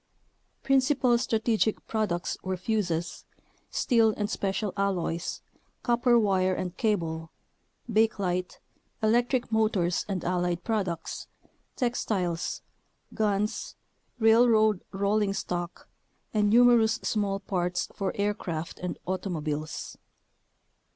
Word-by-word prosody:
Principal 270 -2 +3
strategic 225 -2 0
prod 215 -2 -1
ucts 175 0 -2
were 185 0 -2
fuzes, 180 -4 -2 0.5
steel 225 -4 +3
and 205 0 -2
special 195 0 -1
alloys, 185 -4 -2 0.4
copper 240 0 +3
wire 190 -4 +2
and 180 -1 -4
cable, 165 -7 -1 0.6
bakelite, 200 -5 0 0.5
electric 240 +2 +2
motors 215 -6 +1
and 190 -4 -2
allied 175 -1 0
products, 195 -7 -2 0.5
textiles, 195 -8 -1 0.5
guns, 210 -1 -1 0.4
railroad 220 -3 +5
rolling 200 +1 +1
stock, 175 -2 -4 0.5
and 210 -1 +3
numerous 230 -1 +5
small 200 -2 0
parts 180 -3 -1
for 195 -1 -2
aircraft 195 -6 -3
and 180 -1 -4
automobiles. 155 -5 -4
200 Hz, 95 wpm, -28 LUFS, 180-220 Hz, 0.6 s, railroad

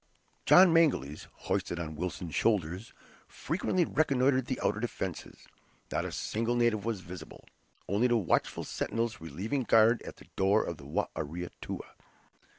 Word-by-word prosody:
John 180 -2 +8
Mangles, 130 - +2
hoisted 85 - -3
on 80 -2 -5
Wilson's 90 0 -4
shoulders, 95 -1 0 0.4
frequently 175 +2 -1
reconnoitered 130 -4 +2
the 130 - -2
outer 105 - +1
defences. 95 -6 -5 0.4
Not - - -1
a - - -4
single 115 +2 -1
native 120 -3 +1
was 115 -5 -2
visible; 90 +1 -10 0.4
only 105 +6 +2
the 120 -1 +3
watchful 100 -7 0
sentinels 115 -4 -3
relieving 95 - -3
guard 115 0 +4
at - - -9
the - - -16
door 100 +3 +3
of 85 - -5
the 70 - -12
Ware 75 - -1
Atoua. 85 +4 -6
110 Hz, 145 wpm, -30 LUFS, 90-120 Hz, 0.4 s, John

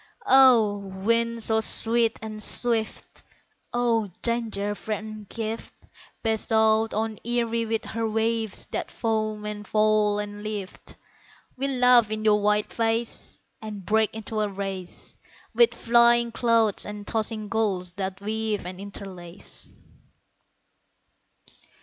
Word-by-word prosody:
O! 250 - +6
wind 230 +4 -1
so 220 0 +3
sweet 230 +1 +3
and 215 -1 -5
swift, 230 -1 +1 0.5
O! 230 -3 +1
danger 225 -4 0
freighted 215 0 -6
gift 225 0 -5 0.5
Bestowed 220 0 +2
on 220 0 -2
Erie 230 -1 -1
with 225 0 -2
her 225 0 -3
waves 225 -1 -1
that - - -3
foam 215 -2 -2
and 210 0 -6
fall 215 -1 +2
and 205 0 -5
lift, 210 -3 -7 0.6
We 270 +2 -2
laugh 250 -4 +5
in 215 0 -3
your 210 -1 +4
wild 210 0 +1
face, 230 0 -2 0.2
And 210 -3 -8
break 220 +1 +1
into 220 0 -4
a 210 -1 0
race 195 -2 -6 0.4
With 475 -1 +4
flying 235 0 +4
clouds 230 -3 +2
and 210 0 -6
tossing 220 -1 -2
gulls 200 -5 -1
that 190 +1 -5
weave 215 0 -2
and 180 +1 -7
interlace. 195 -3 -8
220 Hz, 120 wpm, -25 LUFS, 210-230 Hz, 0.6 s, O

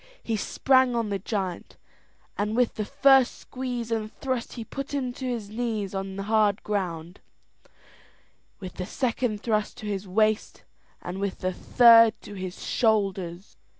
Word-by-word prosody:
He 225 - -1
sprang 260 +4 +2
on 230 -2 -1
the 200 -1 -2
giant, 190 -3 -4 0.6
and 210 +2 -1
with 245 -1 +2
the 215 - -3
first 270 +2 +4
squeeze 245 -3 -5
and 220 -1 -2
thrust 255 -3 -4
he 235 - -6
put 275 +3 -5
him 255 -3 -2
to 260 +1 -5
his 225 -5 -4
knees 220 -4 -3
in 195 0 -4
the 195 - -4
hard 215 -1 +2
ground, 180 -4 -3 1.4
with 185 -3 -9
the 185 - -4
second 235 -4 -1
thrust 215 -3 -1
to 230 - -9
his 200 -1 -3
waist, 215 +3 0 0.4
and 180 +2 -5
with 200 -1 -3
the 185 0 -1
third 230 +1 +6
to - - -9
his 185 -2 -7
shoulders. 195 -5 0
215 Hz, 155 wpm, -26 LUFS, 195-240 Hz, 1.4 s, third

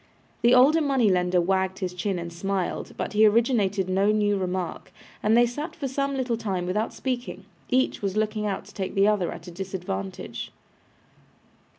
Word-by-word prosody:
The 240 +1 +5
older 285 +6 +6
money 265 -8 +3
lender 180 0 +2
wagged 190 +1 0
his 185 -2 -3
chin 185 +1 -2
and 170 0 -6
smiled, 195 +1 -3
but - - -3
he 215 +1 +6
originated 210 -4 +2
no 195 +3 +2
new 205 -1 +2
remark, 185 -2 -3 0.3
and 220 +2 +3
they 240 - +6
sat 295 +8 -5
for 285 -4 -3
some 275 +1 -1
little 245 -3 -1
time 190 -5 -2
without 210 +5 -1
speaking. 245 -7 -4 0.2
Each 260 +1 +1
was 200 0 -2
looking 215 0 0
out 195 -1 -3
to 205 - -15
take 190 -2 -4
the 195 +1 +4
other 205 -4 +1
at - - -9
a 175 - -8
disadvantage. 175 - -5
205 Hz, 180 wpm, -25 LUFS, 185-235 Hz, 0.3 s, older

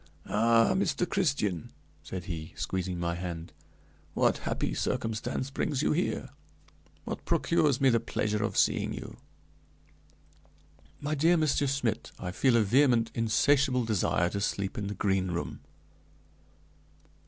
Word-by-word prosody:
"Ah, 115 +1 +3
Master 190 -2 +1
Christian," 140 - -1 0.3
said 95 -2 -6
he, 80 -4 -6
squeezing 95 -1 -2
my 85 0 -1
hand, 85 -2 -6 0.6
"what - - +2
happy - - -1
circumstance 115 - -2
brings 140 0 -1
you - - +2
here? 175 +4 -1 0.8
What - - -5
procures 155 -6 +2
me 135 -1 +5
the 115 - +3
pleasure 105 -1 -1
of 115 - -2
seeing - - +2
you?" - - -8 1.8
"My 145 +1 -2
dear 165 +4 +4
Monsieur 150 -2 +2
Schmidt, 125 -5 -1
I 90 - -5
feel 120 +5 +3
a 115 - +4
vehement, 120 +1 +3
insatiable 125 +3 +2
desire 90 -5 +1
to 100 - -3
sleep 100 -1 -2
in 105 - -3
the 100 - -4
Green 95 -1 +1
Room." 85 -1 -4
115 Hz, 130 wpm, -29 LUFS, 95-140 Hz, 1.8 s, me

